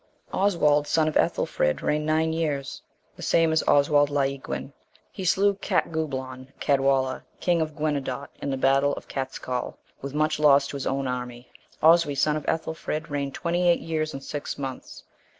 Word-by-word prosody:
Oswald 150 -7 +2
son 160 -1 +2
of 155 - -1
Ethelfrid, 75 0 +1
reigned 150 0 0
nine 160 +1 +1
years; 150 -5 -2 0.3
the - - -12
same 165 -1 +3
is 160 - +3
Oswald 145 0 +4
Llauiguin;(1) 140 -1 -2 0.4
he 190 - -7
slew 195 +3 +3
Catgublaun 130 -9 -2
(Cadwalla),(2) 135 -2 +1 0.2
king 175 -2 +1
of 155 -1 -3
Guenedot,(3) 140 -3 -2
in - - -3
the 135 - -1
battle 135 +2 +3
of - - -8
Catscaul,(4) 130 -2 -4 0.3
with 140 +1 -6
much 155 0 +1
loss 140 -2 +5
to - - -6
his 140 - -3
own 135 0 -1
army. 125 -1 -5 0.3
Oswy, 165 -2 +5
son 150 +2 +2
of 155 - -5
Ethelfrid, 160 -1 -3
reigned 140 -1 -2
twenty 175 +1 +1
eight 170 - +3
years 155 -1 -2
and 135 - -7
six 145 -1 -5
months. 135 -2 -7
145 Hz, 165 wpm, -25 LUFS, 135-160 Hz, 0.4 s, loss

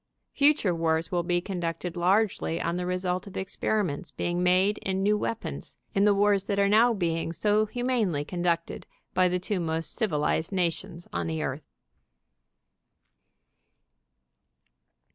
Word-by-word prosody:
Future 285 - +3
wars 165 0 0
will 175 -1 +1
be 175 0 0
conducted 175 -2 -4
largely 175 - +1
on 170 - -1
the 180 0 -2
result 180 +1 -1
of 200 - -8
ex 190 0 -4
periments 185 -6 -1
being 175 0 -2
made 185 +3 +3
in 190 0 -2
new 210 +1 +3
weapons, 225 +2 -4 0.2
in 200 +1 +3
the 205 - +5
wars 200 -1 +3
that 200 - -1
are 200 0 +4
now 225 +4 +5
being 165 -6 -1
so 210 +5 +2
humanely 225 - 0
conducted 175 -1 -2 0.3
by 185 0 +4
the 180 - 0
two 190 +2 -2
most 165 -1 -2
civilized 160 - 0
nations 175 -1 -2
on - - -2
the 160 -1 -2
earth. 135 +2 -5
180 Hz, 145 wpm, -27 LUFS, 170-205 Hz, 0.3 s, the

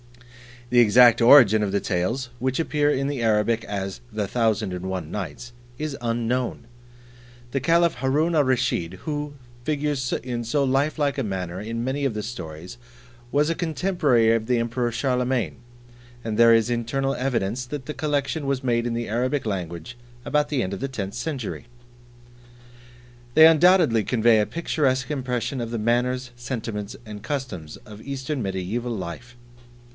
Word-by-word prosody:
The 125 - +5
exact 120 +1 +6
origin 115 -4 +7
of 100 -2 0
the 100 - +1
Tales, 110 +8 -1
which 130 +3 -1
appear 150 -2 +1
in 135 -1 0
the 140 -4 -3
Arabic 110 +1 +2
as 100 -1 -4
"The 105 -1 -2
Thousand 110 -2 0
and 90 0 -5
One 90 -4 -4
Nights," 105 +5 -6 0.3
is 150 0 -3
unknown. 120 +1 -1 0.9
The 135 - 0
Caliph 170 +4 +3
Haroon 145 +6 +1
al 150 -3 +3
Rusheed, 125 -9 0
who, 150 +1 -4 0.3
figures 145 -2 -1
in 120 -2 -3
so 140 +5 0
lifelike 140 +2 +1
a 135 - 0
manner 95 -4 -4
in 115 +3 -4
many 135 +3 -1
of 135 - 0
the 105 0 -4
stories, 90 -4 -7 0.6
was 145 +2 +3
a - - +2
contemporary 155 -8 +2
of 115 -1 0
the 125 - +2
Emperor 120 +1 -1
Charlemagne, 125 -1 0 0.7
and 110 -2 -3
there 115 0 +7
is 115 +1 +3
internal 125 +3 -1
evidence 125 -2 -1
that 135 0 -6
the 150 - -5
collection 145 -1 -1
was 135 -1 -1
made 120 -1 +1
in 120 - -2
the 120 0 -3
Arabic 125 +4 -1
language 90 +2 -5 0.3
about 150 0 +1
the 140 -5 0
end 95 - -3
of 100 - -5
the 135 - -2
tenth 100 -7 -5
century. 125 -3 -4 1.7
They 160 - +9
undoubtedly 160 - +5
convey 115 -2 +4
a 105 - +1
picturesque 140 -5 -1
impression 125 -2 -2
of 115 -1 -3
the 115 - -3
manners, 125 +3 0
sentiments, 115 -4 -5
and 105 -1 -8
customs 115 - -5
of 105 0 -11
Eastern 135 +1 -4
Mediaeval 100 +5 -3
Life. 105 +6 -7
120 Hz, 160 wpm, -24 LUFS, 110-140 Hz, 1.7 s, They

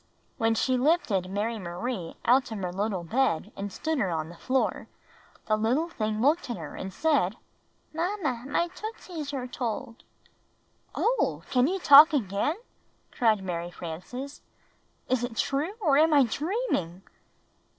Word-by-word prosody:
When 225 0 +2
she 255 +3 +1
lifted 245 - +1
Mary 215 +3 -2
Marie 180 +1 -4
out 250 +1 +4
of 220 - -4
her 180 -2 -4
little 195 -2 -2
bed 215 -2 0
and 200 0 -5
stood 315 +7 -2
her 190 - +1
on 160 -2 -2
the 175 - -11
floor, 260 +9 -1 0.6
the 215 - +2
little 245 +10 +1
thing 215 -8 -2
looked 290 +4 +2
at 240 - -3
her 160 -3 -8
and 190 - -6
said, 280 - +1 0.6
"Mamma, 325 - -2
my 340 +4 0
tootsies 365 -6 -7
are 265 -3 -3
told." 245 -1 -5 0.9
"Oh, - - 0
can 250 0 +4
you 375 +4 0
talk 310 -2 +9
again?" 210 - 0 0.6
cried 220 -5 +2
Mary 175 -2 -3
Frances. 180 - -7 0.7
"Is 255 -2 +1
it 240 -2 -4
true, 290 +8 0
or 295 -7 +4
am 315 0 +4
I 280 - +7
dreaming?" 255 - -2
245 Hz, 150 wpm, -27 LUFS, 195-295 Hz, 0.9 s, talk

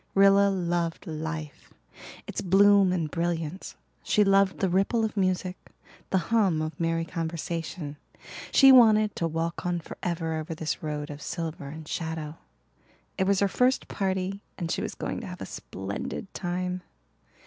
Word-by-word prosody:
Rilla 200 0 +6
loved 175 -3 -1
life 155 -2 -6 0.5
its - - -4
bloom 200 0 +5
and 165 -4 -1
brilliance; 170 0 -3 0.3
she 210 - +3
loved 195 -1 +3
the 190 - +1
ripple 195 +5 +2
of 220 - -4
music, 185 -1 0 0.5
the 190 - +2 0.2
hum 195 -8 +3
of 155 0 -4
merry 165 0 0
conversation; 165 -2 -4 0.5
she 270 0 +8
wanted 215 -4 +6
to 165 - 0
walk 165 +1 -3
on 175 -1 0
forever 165 -1 -3
over 160 +1 -5
this 155 0 -3
road 150 -1 -4
of 145 +1 -8
silver 165 -4 -4
and 155 +2 -8
shadow. 160 -1 -4 0.8
It 190 - +2
was 200 0 +3
her 200 - +4
first 250 +6 +1
party 190 0 -2 0.2
and 170 -3 -3
she - - -1
was - - -4
going - - -4
to - - -7
have - - -8
a - - -5
splendid 100 - -6
time. 180 0 -3
175 Hz, 155 wpm, -27 LUFS, 160-195 Hz, 0.8 s, she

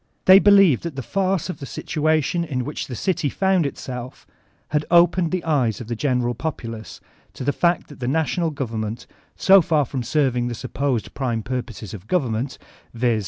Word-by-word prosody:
They 190 +1 +9
believe 195 - +5
that 170 -4 -6
the 135 - -4
farce 190 - 0
of 180 - -6
the 140 - -7
situation 155 +2 0
in 130 -6 -3
which 150 - -5
the 125 - -6
dty 170 - -1
found 190 -5 +2
itself, 125 -2 -7 0.4
had 150 0 0
opened 175 0 +4
the 185 0 -2
eyes 135 -9 +1
of 120 -2 -8
the 120 - -2
general 125 -1 0
populace 115 -6 -6 0.4
to - - -6
the 145 +2 +1
fact 175 0 +1
that 145 - -13
the 125 - -3
national 160 +3 0
govemmenty 115 -5 -4 0.3
so 195 0 +6
far 155 -3 +1
from 130 +1 -4
serving 125 -1 0
the 120 - -3
supposed 135 -1 -2
prime 120 -5 -2
purpose 120 -5 -5
of 105 -1 -9
gov 180 -6 +1
emment, 120 +4 -3 0.4
viz. 120 -2 +1
140 Hz, 185 wpm, -22 LUFS, 120-170 Hz, 0.4 s, They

